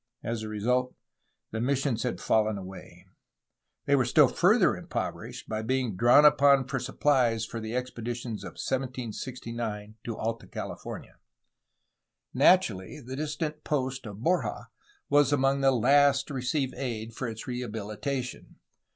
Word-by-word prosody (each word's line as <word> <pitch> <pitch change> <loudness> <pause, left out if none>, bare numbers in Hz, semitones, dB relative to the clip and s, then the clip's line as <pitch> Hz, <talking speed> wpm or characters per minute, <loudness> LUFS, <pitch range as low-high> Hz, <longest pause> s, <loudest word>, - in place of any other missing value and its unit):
As 115 -1 -3
a 110 - -5
result 125 +4 0 0.6
the 110 - -3
missions 130 -2 0
had 125 0 -2
fallen 110 -1 +2
away, 95 -2 -10
and 95 - -32 0.7
they 140 - +4
were 130 - +3
still 125 - +5
further - - +4
impoverished - - -5
by 110 0 -2
being 125 -2 -1
drawn 120 +8 +6
upon 140 -2 +6
for 135 -1 -2
suppUes 125 -3 +1
for 115 - -5
the 110 +1 -5
expeditions 120 -2 -4
of - - -7
1769 120 -4 -4
to 115 -2 -5
Alta 115 +1 -3
California. - - -7 1.2
Naturally, 120 - +3
the 130 -1 -7
distant 150 +1 -3
post 130 -4 -2
of 105 +2 -9
Borja 180 +4 0 0.4
was 145 -1 +4
among 135 0 +2
the 135 - +5
last 140 +2 +4
to - - -5
receive 130 +1 -1
aid 115 -3 -4
for 125 - -4
its 115 -1 -6
rehabilitation. 120 +2 -4
125 Hz, 140 wpm, -28 LUFS, 110-135 Hz, 1.2 s, drawn